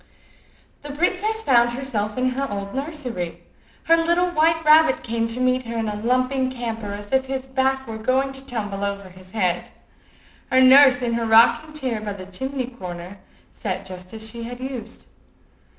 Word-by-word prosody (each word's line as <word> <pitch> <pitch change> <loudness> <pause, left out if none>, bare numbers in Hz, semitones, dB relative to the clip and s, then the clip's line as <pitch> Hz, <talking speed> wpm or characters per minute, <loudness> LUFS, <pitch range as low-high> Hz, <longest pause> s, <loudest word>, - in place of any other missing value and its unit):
The 290 -1 -7
princess 410 +7 +1
found 240 - +4
herself 230 -5 -3
in 255 0 +2
her 270 +2 -3
old 200 -1 -5
nursery. 265 - -5 0.4
Her 330 - +5
little 345 +2 +2
white 325 0 +2
rabbit 310 -2 +5
came 230 -1 -1
to 230 +2 -5
meet 255 -1 +1
her 230 0 -4
in 225 -1 -1
a 210 - -3
lumping 255 +2 +1
canter 225 -5 -5
as 205 0 -10
if 265 0 +2
his 265 0 -4
back 265 0 0
were 220 -2 -7
going 260 +4 +1
to 270 0 -10
tumble 205 -6 -4
over 200 -1 -4
his 185 0 -16
head. 185 -6 -1 0.8
Her 260 - +5
nurse, 260 -1 +7
in 235 -1 0
her 230 -1 -1
rocking 235 +7 +4
chair 255 -7 -2
by 210 -1 -4
the 190 -2 -9
chimney 265 +7 -4
corner, 185 -5 -8 0.3
sat 190 -3 -4
just 185 -1 -9
as 220 0 -5
she 235 +1 -6
had 245 +1 -7
used. 255 -4 -7
245 Hz, 180 wpm, -22 LUFS, 215-270 Hz, 0.8 s, nurse